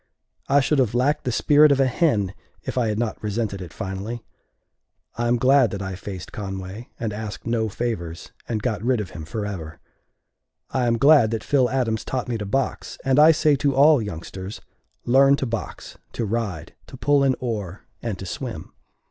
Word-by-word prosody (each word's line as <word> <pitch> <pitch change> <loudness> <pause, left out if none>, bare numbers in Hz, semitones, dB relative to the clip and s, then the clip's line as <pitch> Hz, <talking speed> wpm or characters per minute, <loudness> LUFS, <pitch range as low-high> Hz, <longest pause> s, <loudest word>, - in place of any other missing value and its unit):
I 140 +1 +5
should 145 +1 +1
have 120 -3 +1
lacked 140 +4 +1
the 125 - 0
spirit 150 +4 +5
of 140 - +3
a 135 - +5
hen 120 - +1 0.3
if - - -5
I 125 -3 +1
had 105 -1 -1
not 115 -1 -2
resented 105 -2 -2
it 90 -3 -8
finally. 100 +6 -5 0.9
I 120 0 -1
am 120 +1 +3
glad 130 0 +4
that 100 - -5
I 95 0 -4
faced 95 -1 -7
Conway, 95 +2 -6
and 110 -3 -2
asked 105 0 -6
no 115 -1 0
favors, 90 -7 -4 0.2
and 110 -3 -2
got 110 -6 -1
rid 125 +1 +1
of 105 - -5
him 80 -3 -8
forever. 90 -4 -5 0.9
I 130 -2 +1
am 115 0 +2
glad 140 -3 +6
that 115 -1 -3
Phil 130 -4 +2
Adams 115 -4 0
taught 130 -2 -3
me 120 -2 -2
to 105 - -4
box, 135 +6 -2
and 135 +1 +3
I 155 +2 +9
say 150 -2 +3
to 140 0 +1
all 145 0 +6
youngsters: 95 0 -6 0.5
Learn 135 +3 +5
to 140 - -2
box, 115 -2 -6
to 115 - -2
ride, 105 -7 -3
to - - -11
pull 145 -1 +3
an 135 -1 +3
oar, 105 -6 -4 0.2
and 110 -5 -3
to 95 - -7
swim. 90 - -6
115 Hz, 190 wpm, -23 LUFS, 100-130 Hz, 0.9 s, I